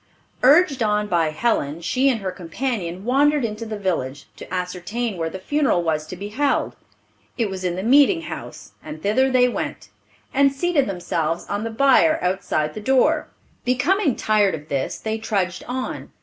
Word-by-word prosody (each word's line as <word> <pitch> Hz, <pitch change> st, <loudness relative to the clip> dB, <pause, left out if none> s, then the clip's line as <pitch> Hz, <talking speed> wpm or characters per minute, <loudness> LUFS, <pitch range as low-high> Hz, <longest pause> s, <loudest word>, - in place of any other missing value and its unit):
Urged 280 Hz, 0 st, +5 dB
on 210 Hz, -1 st, +1 dB
by 170 Hz, -5 st, +1 dB
Helen, 155 Hz, -4 st, -1 dB
she 260 Hz, +10 st, +1 dB
and 235 Hz, -5 st, 0 dB
her 190 Hz, -1 st, -3 dB
companion 185 Hz, 0 st, -4 dB
wandered 285 Hz, +2 st, +3 dB
into 220 Hz, +1 st, -5 dB
the 215 Hz, -1 st, -4 dB
village, 145 Hz, -9 st, -2 dB
to -, -, -11 dB
ascertain 185 Hz, +5 st, -3 dB
where 165 Hz, -2 st, -2 dB
the 190 Hz, -, -6 dB
funeral 255 Hz, -3 st, +1 dB
was 155 Hz, -2 st, -1 dB
to 185 Hz, -, -7 dB
be 200 Hz, +3 st, -7 dB
held. 280 Hz, +7 st, 0 dB, 0.6 s
It 225 Hz, -5 st, 0 dB
was 190 Hz, -1 st, -5 dB
in 180 Hz, -1 st, -1 dB
the 185 Hz, -, -4 dB
meeting 285 Hz, -, +5 dB
house, -, -, -8 dB
and 300 Hz, -, -9 dB
thither 260 Hz, +7 st, +3 dB
they 255 Hz, -1 st, +4 dB
went, 245 Hz, -, -4 dB, 0.4 s
and 275 Hz, 0 st, +4 dB
seated 290 Hz, 0 st, +1 dB
themselves 170 Hz, -3 st, -2 dB
on 205 Hz, +1 st, -2 dB
the 230 Hz, -, -3 dB
bier 275 Hz, +6 st, +4 dB
outside 180 Hz, -5 st, -1 dB
the 215 Hz, -, -7 dB
door. 260 Hz, +4 st, +2 dB, 0.4 s
Becoming 280 Hz, -, +1 dB
tired 210 Hz, -4 st, +2 dB
of 150 Hz, 0 st, -11 dB
this, 135 Hz, -2 st, -2 dB
they 220 Hz, 0 st, -3 dB
trudged 190 Hz, -4 st, -2 dB
on. 255 Hz, +1 st, -4 dB
215 Hz, 175 wpm, -22 LUFS, 180-265 Hz, 0.6 s, Urged